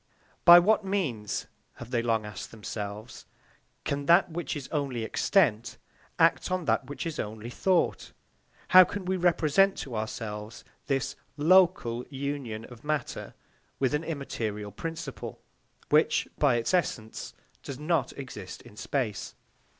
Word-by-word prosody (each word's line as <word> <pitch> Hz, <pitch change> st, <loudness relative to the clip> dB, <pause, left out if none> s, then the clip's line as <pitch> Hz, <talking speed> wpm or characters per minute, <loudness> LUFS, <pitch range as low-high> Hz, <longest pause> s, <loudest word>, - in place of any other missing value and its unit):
By 175 Hz, 0 st, +11 dB
what 210 Hz, +4 st, +4 dB
means, 150 Hz, -, -2 dB, 0.3 s
have 120 Hz, +1 st, -10 dB
they 120 Hz, -2 st, +1 dB
long 115 Hz, -2 st, 0 dB
asked 105 Hz, -3 st, -7 dB
themselves, 105 Hz, 0 st, -7 dB, 0.6 s
can 140 Hz, 0 st, -2 dB
that 170 Hz, +1 st, +5 dB
which 170 Hz, 0 st, -3 dB
is 140 Hz, -3 st, -6 dB
only 140 Hz, -6 st, -2 dB
extent 120 Hz, -, +1 dB, 0.4 s
act 165 Hz, -5 st, +3 dB
on 185 Hz, -2 st, -1 dB
that 135 Hz, -, +1 dB
which 145 Hz, -, -5 dB
is 165 Hz, -2 st, -4 dB
only 110 Hz, +2 st, -5 dB
thought? 185 Hz, +6 st, +1 dB, 0.6 s
How 185 Hz, 0 st, +10 dB
can 200 Hz, +1 st, -5 dB
we 190 Hz, +1 st, 0 dB
represent 175 Hz, +1 st, +3 dB
to 125 Hz, -4 st, -5 dB
ourselves 110 Hz, 0 st, -5 dB, 0.2 s
this 135 Hz, -1 st, -1 dB, 0.2 s
local 160 Hz, -7 st, +4 dB
union 135 Hz, -5 st, -4 dB
of 120 Hz, -2 st, -13 dB
matter 150 Hz, 0 st, -3 dB, 0.4 s
with 135 Hz, 0 st, +1 dB
an 150 Hz, +2 st, 0 dB
immaterial 110 Hz, -10 st, -4 dB
principle, 135 Hz, -, -6 dB, 0.5 s
which, -, -, +3 dB
by 140 Hz, -5 st, +4 dB
its 120 Hz, +8 st, -1 dB
essence, 120 Hz, -11 st, -2 dB, 0.3 s
does 140 Hz, -, -7 dB
not 155 Hz, -2 st, 0 dB
exist 105 Hz, -9 st, -8 dB
in 120 Hz, -4 st, -15 dB
space? 105 Hz, -, -3 dB
135 Hz, 135 wpm, -28 LUFS, 115-165 Hz, 0.6 s, By